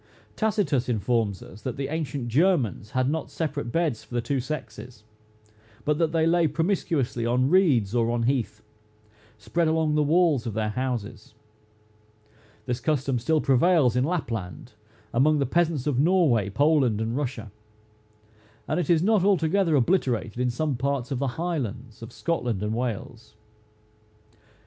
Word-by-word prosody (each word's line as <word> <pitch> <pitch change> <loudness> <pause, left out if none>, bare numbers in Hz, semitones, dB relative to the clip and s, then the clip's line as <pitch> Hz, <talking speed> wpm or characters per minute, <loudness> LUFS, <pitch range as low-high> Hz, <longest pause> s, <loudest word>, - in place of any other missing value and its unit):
Tacitus 190 - 0
informs 110 -3 0
us 105 - -13
that 125 0 -5
the 135 0 -3
ancient 145 -5 -3
Germans 130 - +1
had 130 +2 0
not 160 +3 -2
separate 145 -6 -3
beds 160 -8 -1
for 120 - -10
the - - +2
two 135 +4 -1
sexes, 120 -4 -7 0.8
but 150 0 +1
that 165 -2 +1
they 160 -1 +2
lay 170 0 +3
promiscuously 155 - -1
on 125 +4 +1
reeds 140 - +3
or 115 -1 +1
on 120 0 0
heath, 115 -4 -1 0.7
spread 165 +10 -1
along 160 -1 +1
the 150 - +2
walls 150 -5 +2
of 110 - -4
their 110 -1 -1
houses. 115 -2 -4 1.3
This 125 +1 -2
custom 135 -1 0
still 155 +6 +1
prevails 135 -1 +3
in 125 - +2
Lapland, 115 - -4 0.4
among 150 +5 +3
the 140 - +1
peasants 160 -1 0
of 140 -4 0
Norway, 145 - +3
Poland, 140 -3 +2
and 110 +1 -2
Russia; 125 -6 -4 1.2
and - - 0
it 180 - -2
is 165 -1 +4
not 210 -2 +3
altogether 190 -2 +2
obliterated 125 - 0
in 125 0 +1
some 140 +2 -2
parts 140 0 -2
of 130 - -1
the 140 - 0
highlands 130 - -4
of 115 - -9
Scotland 120 - -2
and 105 +1 -1
Wales. 115 -1 -5
135 Hz, 150 wpm, -25 LUFS, 115-160 Hz, 1.3 s, is